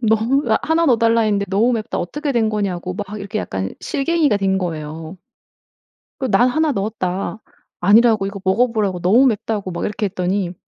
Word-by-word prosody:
너무 225 +5 +2 0.2
1 325 +1 +1
넣어달라 230 -3 +3
했는데 205 -2 +1
너무 215 +6 +2
맵다. 225 -1 -3
어떻게 290 - -3
된 230 -3 +2
거냐."고 190 -4 -3
막 200 +1 -5
이렇게 200 +2 -4
약간 95 - -4
실갱이가 295 -4 +1
된 195 -1 0
거예요. 160 -1 -5 1.0
그 260 - -1
"난 245 - +4
1 315 +3 +1
넣었다." 200 -2 -3 0.4
아니라고 215 +2 +4
이거 200 0 -5
먹어 220 +6 +2
보라고 200 -5 -1
너무 205 +10 +4
맵다고 210 -4 -2
막 170 - -4
이렇게 210 0 -2
했더니 185 -1 -2
210 Hz, 350 characters per minute, -19 LUFS, 190-235 Hz, 1.0 s, 난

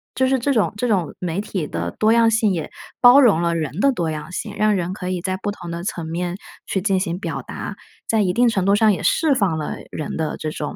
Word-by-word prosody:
就 260 - +2
是 265 0 +2
这 280 +4 0
种 220 -5 +1
这 245 +4 -1
种 190 -8 0
媒 175 0 -2
体 200 -5 -3
的 85 +1 -3
多 215 - +2
样 230 -1 +5
性 220 -2 +2
也 165 -4 -3 0.3
包 245 +3 +8
容 205 - +4
了 170 -1 +1
人 155 0 -3
的 275 +5 +4
多 170 -10 -2
样 155 +1 -6
性， 175 - -5
让 215 0 +3
人 180 -1 -2
可 185 -1 -6
以 185 -1 -2
在 185 +1 -2
不 205 +2 -3
同 175 -4 -8
的 170 0 -5
层 170 -4 -4
面 175 +2 -3 0.3
去 190 - -1
进 195 -1 +1
行 175 -1 -2
表 - - -4
达， - - -7 0.3
在 220 -1 +2
一 185 -3 +1
定 240 +3 +4
程 195 -5 0
度 200 +1 +4
上 215 +1 +4
也 195 - -2
释 315 -3 +3
放 195 -9 +1
了 150 - -4
人 155 - -5
的 160 -1 -2
这 155 - -4
种 150 -1 -5
190 Hz, 280 characters per minute, -21 LUFS, 170-215 Hz, 0.3 s, 包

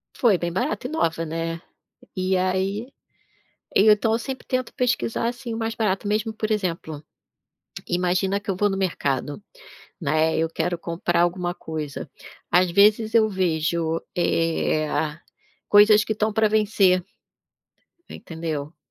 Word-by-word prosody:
Foi 220 -7 +3
bem 170 0 -3
barata 205 +6 -2
e - - -9
nova, 165 - 0
né. 165 +1 -4 0.6
E 185 +1 +1
aí, 190 +5 -1 0.9
e 215 +2 +6
então 210 +1 +3
eu 225 - +2
sempre 260 +2 -6
tento 255 -1 -2
pesquisar, 240 -2 0
assim, 240 -1 -5
o - - -4
mais 225 0 -2
barato 205 -3 -1
mesmo, 215 +2 0
por 215 0 -3
exemplo, 170 -7 -2 0.9
imagina 185 +3 0
que 200 - -5
eu 185 - -1
vou 205 +1 +2
no 195 - -2
mercado, 145 -3 -2 0.6
né, 160 +1 +1
eu 165 0 +1
quero 175 +1 -2
comprar 170 0 -1
alguma 175 0 0
coisa, 155 -3 -6 0.4
às 180 0 +4
vezes 215 +3 +4
eu 220 -1 +5
vejo, 165 -3 0 0.2
eh, 165 -2 +1 0.8
coisas 210 +1 +7
que 220 - -2
estão 215 +1 0
pra 220 0 +3
vencer 205 -4 +3 1.1
entendeu. 160 -2 -6
185 Hz, 140 wpm, -23 LUFS, 165-215 Hz, 1.1 s, coisas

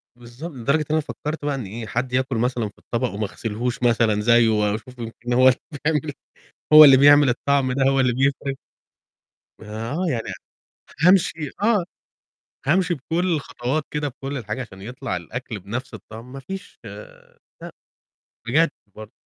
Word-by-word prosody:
بالضب 120 +7 -10
لدرجة 140 +5 +1
إن - - -3
أنا 155 - +3
فكّرت 150 0 -5
بقى 145 - 0
إن 130 -6 -5
إيه، 110 +3 -7
حد 125 +3 -3
ياكُل 130 0 0
مثلًا 120 -2 -1
في 100 - -24
الطبق 120 +2 -2
وما 105 +1 -2
غسلهوش 115 +4 -4
مثلًا 115 -3 +2
زيّه 115 0 +5
وأشوف 110 +4 -1
يمكن 120 +1 -5
هو 130 +1 +5
اللي 125 - +1 0.3
بيعمل، 150 -1 0 0.6
هو 155 0 +12
اللي 135 -2 +8
بيعمل 145 0 +7
الطعم 130 +1 +1
ده 135 +1 +1
هو 135 0 +1
اللي 125 -2 +2
بيفرق. 135 +1 0 1.1
ما 110 +3 -6
آه، 180 +5 -1
يعني 115 -6 -2 0.7
فهامشي 165 -4 +3
آه، 210 -4 +3 0.8
هامشي 175 +3 +2
بكل 170 +5 -1
الخطوات 140 0 -3
كده 150 0 -2
بكل 135 +1 -6
الحاجة 110 +1 -4
عشان 95 -6 -10
يطلع 125 -1 -5
الأكل 110 +4 -6
بنَفْس 120 +6 -6
الطعم 115 +4 -11
ما 135 - -7
فيش 190 +8 -9 0.8
لأ، - - -8 0.8
بجد 155 +5 +3 0.2
برضه. 110 0 -10
130 Hz, 160 wpm, -22 LUFS, 115-145 Hz, 1.1 s, هو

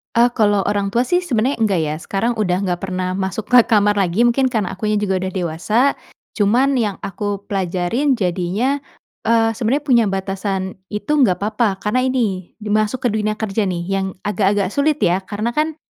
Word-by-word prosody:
A 240 +1 +4
kalau 205 -4 +2
orang 205 0 0
tua 235 +5 +1
sih 355 +8 +1
sebenarnya 260 -7 -1
enggak 205 -5 +2
ya, 150 -1 -2
sekarang 225 +6 -2
udah 185 -2 0
enggak 180 -2 -1
pernah 185 -1 -3
masuk 190 +3 -4
ke 250 - +8
kamar 205 -2 +3
lagi 190 +4 +2
mungkin 240 +2 +3
karena 220 -7 -1
akunya 210 +2 -1
juga 195 -2 0
udah 190 - -3
dewasa. 175 +5 -1 0.5
Cuman 235 +6 +2
yang 210 -4 0
aku 200 +1 -4
pelajarin 195 +9 0
jadinya, 195 +8 -1 0.5
eee, 225 0 +3
sebenarnya 240 +5 -1
punya 245 -6 +4
batasan 190 0 -3
itu 210 +8 -4
enggak 200 -7 +2
papa 215 -1 +1
karena 210 +5 +1
ini 210 -9 -2
di 210 -1 -8
masuk 215 +4 0
ke 245 - +2
dunia 215 0 -1
kerja 215 -1 -1
nih 175 -2 -2
yang 195 0 0 0.2
agak-agak 205 -2 +1
sulit 295 +3 +1
ya. 175 +2 +3
Karena 205 +4 -3
kan 305 +4 -1
210 Hz, 180 wpm, -19 LUFS, 190-235 Hz, 0.5 s, ke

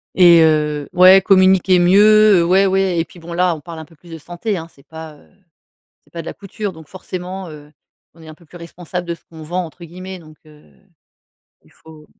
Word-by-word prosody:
Et 175 -2 +6
heu, 150 -2 -1
ouais, 185 +1 +6
communiquer 190 -1 +3
mieux, 210 +2 +4
heu. - - +1
Ouais, 190 +3 +2
ouais, 190 -2 0
et 165 - -1
puis 175 - -18
bon 170 +1 -12
là, 175 0 0
on 150 - -12
parle 165 0 -10
un 160 - -10
peu 165 +1 -23
plus 170 +3 -20
de 165 - -8
santé, 175 +6 -6
hein! 165 0 -8
C'est 140 - -24
pas, 160 -1 -11
heu 145 - -24 0.7
c'est - - -31
pas 170 - -7
de 165 - -13
la - - -6
couture, 200 -1 -7
donc 160 -2 -15
forcément, 185 0 -8
heu, 150 -1 -14 0.4
on 165 - -20
est 160 - -15
un 155 - -12
peu 170 - -23
plus 175 - -15
responsable 175 +1 -8
de 170 - -4
ce - - -29
qu'on 160 -1 -15
«vend» 175 +3 -4
entre 170 +2 -14
guillemets, 185 +2 -10
donc, 155 -2 -18
heu, 150 -1 -20 1.0
il - - -25
faut 155 -1 -18
175 Hz, 230 wpm, -17 LUFS, 160-185 Hz, 1.0 s, Et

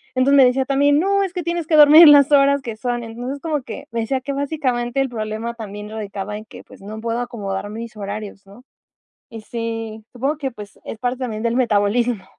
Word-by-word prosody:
Entonces, 275 +2 +4
me 265 - +8
decía 260 +2 +2
también: 285 +1 +3
"No, 395 +2 +2
es 370 -2 -4
que 355 -2 -4
tienes 340 -1 -3
que 315 - +2
dormir 300 +2 +9
en 295 - +10
las 285 0 +5
horas 280 0 +4
que 230 -4 -7
son". 240 0 -3
Entonces, 245 +5 -6
como 300 -5 -2
que - - -9
me 230 - -3
decía 260 +3 -2
que 280 +2 -5
básicamente 270 -3 -1
el 270 - -1
problema 220 0 -4
también 210 -1 -8
radicaba 210 -1 -6
en 215 - -10
que, 245 - -13
pues, - - -17
no 215 +2 -8
puedo 230 +1 -2
acomodar 205 -5 -5
mis 225 0 -8
horarios, 200 0 -7
¿no? 205 +6 -16 0.7
Y 225 -2 -9
sí, 225 -1 -5
supongo 275 +5 -2
que, 270 -2 -2
pues, 210 -2 -12
es 225 - -7
parte 250 +1 -2
también 225 -3 -4
del 235 0 0
metabolismo. 230 -1 +1
240 Hz, 220 wpm, -20 LUFS, 215-275 Hz, 0.7 s, en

